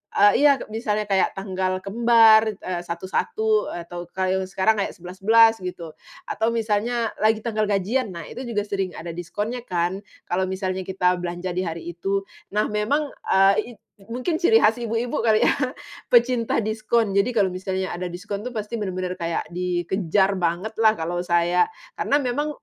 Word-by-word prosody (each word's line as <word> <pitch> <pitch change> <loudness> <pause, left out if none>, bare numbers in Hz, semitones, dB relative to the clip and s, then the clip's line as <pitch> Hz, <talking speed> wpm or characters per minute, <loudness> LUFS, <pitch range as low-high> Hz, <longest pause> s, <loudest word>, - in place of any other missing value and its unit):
eee 205 +4 +5
iya 280 - +6 0.2
misalnya 215 -1 -1
kayak 195 -2 +1
tanggal 185 -1 -2
kembar, 225 +1 +5
eee, 185 -2 -4
1.1 430 - 0
atau 175 0 -7
kalau 190 0 -1
sekarang 200 +3 +1
kayak 195 - -2
11.11 215 +6 +4
gitu, 180 -3 -6 0.4
atau 220 - 0
misalnya 225 +1 0
lagi 215 0 +2
tanggal 215 -3 -1
gajian 210 +5 0
nah 170 - -6
itu - - -9
juga 210 -3 -1
sering 195 -3 -3
ada 170 - -6
diskonnya 205 +8 -4
kan, 175 +2 -1 0.2
kalau 185 +1 -1
misalnya 190 0 -3
kita 180 -1 +1
belanja 175 +1 -4
di 180 - -2
hari 165 +1 -5
itu. 195 +3 -2 0.3
Nah 210 0 +1
memang, 280 +8 0 0.2
eee, 195 +1 +5
i 240 - -4
it - - -31 0.3
mungkin 285 +9 -2
ciri 445 +6 +6
khas 240 - +3
ibu-ibu 230 +1 -1
kali 220 -2 +3
ya - - +4 0.6
pecinta 240 -1 +3
diskon 220 0 0
jadi 200 +4 +2
kalau 190 -3 +2
misalnya 185 0 -3
ada 180 0 -4
diskon 200 +3 -5
itu 250 - -5
pasti 215 -1 -6
bener-bener 185 -2 -3
kayak 170 -2 -3
dikejar 180 +2 0
bangetlah 215 +6 +1
kalau 175 +2 -2
saya, 175 0 +2 0.2
karena 285 - +1
memang 290 +2 -1
200 Hz, 160 wpm, -23 LUFS, 180-225 Hz, 0.6 s, iya